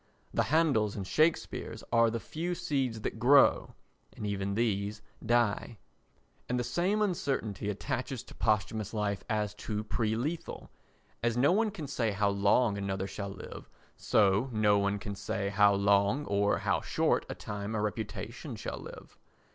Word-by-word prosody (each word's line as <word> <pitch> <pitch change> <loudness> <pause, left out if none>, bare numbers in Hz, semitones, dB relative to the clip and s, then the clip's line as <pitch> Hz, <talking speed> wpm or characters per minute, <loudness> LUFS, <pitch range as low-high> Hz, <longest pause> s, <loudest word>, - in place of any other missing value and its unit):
The - - +2
Handels 140 -10 +2
and 100 - -4
Shakespeares 155 - 0
are 115 0 +5
the 115 +1 -2
few 170 +8 -4
seeds 130 -9 -1
that 110 - -4
grow—and 135 -4 +2
even 100 -1 -2
these 105 -2 -1 0.2
die. 115 -1 +1 0.7
And 125 0 0
the - - 0
same 190 - +1
uncertainty 135 - -1
attaches 130 +3 -3
to - - -14
posthumous 110 0 0
life 100 -2 -1
as 105 -2 0
to 105 -1 -4
pre 110 0 -1
lethal. 150 +9 -4 0.5
As 120 0 0
no 135 +6 +4
one 215 +4 +2
can 190 -7 -6
say 115 -6 -1
how 100 0 +2
long 100 +2 +2
another 95 -1 -2
shall 100 +1 -5
live, 95 - -9 0.3
so 105 +5 +2
no 105 -2 +3
one 100 0 +1
can 100 0 -5
say 100 0 -3
how 100 0 +4
long 100 +7 +3
or 100 0 +2
how - - 0
short - - +1
a - - -4
time 105 +1 -5
a - - 0
reputation 105 +1 -4
shall - - -5
live. - - -11
110 Hz, 155 wpm, -30 LUFS, 100-125 Hz, 0.7 s, are